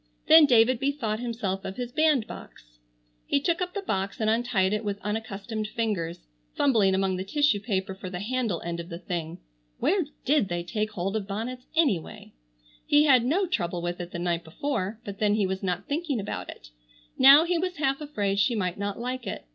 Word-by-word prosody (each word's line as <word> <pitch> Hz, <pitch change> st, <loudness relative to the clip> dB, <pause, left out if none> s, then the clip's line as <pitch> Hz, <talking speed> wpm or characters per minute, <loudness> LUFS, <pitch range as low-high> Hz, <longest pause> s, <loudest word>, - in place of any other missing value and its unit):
Then 315 Hz, -1 st, +8 dB
David 240 Hz, -1 st, +4 dB
bethought 270 Hz, -6 st, -1 dB
himself 225 Hz, -6 st, -3 dB
of 190 Hz, -, -5 dB
his 245 Hz, -1 st, -4 dB
bandbox. 245 Hz, -, -1 dB, 0.5 s
He 280 Hz, -, +2 dB
took 340 Hz, +5 st, 0 dB
up 360 Hz, +1 st, -3 dB
the 400 Hz, -, -3 dB
box 195 Hz, -, -2 dB
and 220 Hz, -1 st, +2 dB
untied 225 Hz, -4 st, +1 dB
it 215 Hz, +1 st, -1 dB
with 200 Hz, -1 st, -3 dB
unaccustomed 215 Hz, +1 st, -4 dB
fingers, 205 Hz, -, -3 dB, 0.3 s
fumbling 215 Hz, -9 st, +3 dB
among 190 Hz, -1 st, 0 dB
the 185 Hz, -, -3 dB
tissue 290 Hz, +2 st, +2 dB
paper 195 Hz, -2 st, -2 dB
for 190 Hz, -1 st, -8 dB
the 180 Hz, -1 st, -5 dB
handle 230 Hz, -4 st, -2 dB
end 170 Hz, 0 st, -4 dB
of 170 Hz, +1 st, -7 dB
the 170 Hz, -, -6 dB
thing. 170 Hz, -2 st, -5 dB, 0.4 s
Where 370 Hz, -2 st, +1 dB, 0.2 s
did 280 Hz, -6 st, +3 dB
they 175 Hz, 0 st, -2 dB
take 215 Hz, +4 st, -2 dB
hold 195 Hz, +2 st, -2 dB
of 205 Hz, -3 st, -2 dB
bonnets 235 Hz, +5 st, -5 dB
anyway? 265 Hz, -, 0 dB, 0.5 s
He 295 Hz, +1 st, +5 dB
had 260 Hz, -5 st, +5 dB
no 335 Hz, +11 st, +1 dB
trouble 175 Hz, -, -2 dB
with 175 Hz, +1 st, -3 dB
it 175 Hz, -1 st, -5 dB
the 175 Hz, -, -6 dB
night 170 Hz, -1 st, -1 dB
before, 215 Hz, -, -3 dB
but 200 Hz, -1 st, -7 dB
then 210 Hz, -1 st, +3 dB
he 210 Hz, -2 st, +2 dB
was 190 Hz, 0 st, -3 dB
not 180 Hz, 0 st, -2 dB
thinking 290 Hz, -4 st, -1 dB
about 200 Hz, -, -5 dB
it. -, -, -11 dB, 0.5 s
Now 275 Hz, +4 st, +9 dB
he 345 Hz, 0 st, 0 dB
was 365 Hz, +1 st, -2 dB
half 275 Hz, -1 st, 0 dB
afraid 205 Hz, -10 st, -1 dB
she 235 Hz, +4 st, +2 dB
might 185 Hz, -3 st, -2 dB
not 200 Hz, 0 st, -3 dB
like 250 Hz, -1 st, -4 dB
it. 190 Hz, -, -5 dB
215 Hz, 200 wpm, -27 LUFS, 190-265 Hz, 0.5 s, Now